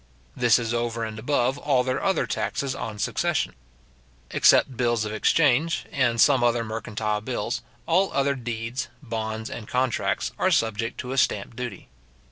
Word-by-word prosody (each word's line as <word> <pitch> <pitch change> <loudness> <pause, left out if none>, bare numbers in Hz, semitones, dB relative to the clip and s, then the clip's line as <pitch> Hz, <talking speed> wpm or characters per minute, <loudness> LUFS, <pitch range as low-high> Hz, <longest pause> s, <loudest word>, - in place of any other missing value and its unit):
This 120 -2 +4
is 115 -1 -2
over 115 -1 -1
and 110 -1 -5
above 130 +1 0
all 135 -4 +2
their 130 0 -1
other 195 -1 +2
taxes 135 -1 -2
on 110 -4 -5
succession. - - 0 0.8
Except 130 - +4
bills 120 -2 +1
of 105 - -4
exchange, 150 +7 +2
and 120 -4 +1
some 130 0 +5
other 120 -1 +2
mercantile 110 -1 -3
bills, 120 +1 -3 0.2
all 185 +7 +2
other 140 0 +1
deeds, 120 -1 -4 0.2
bonds, 110 -2 -4
and 120 -5 -7
contracts, 125 -1 0
are - - +3
subject 115 0 0
to 125 - -6
a 135 - +1
stamp 105 -1 0
duty. 125 0 -6
120 Hz, 155 wpm, -25 LUFS, 110-130 Hz, 0.8 s, some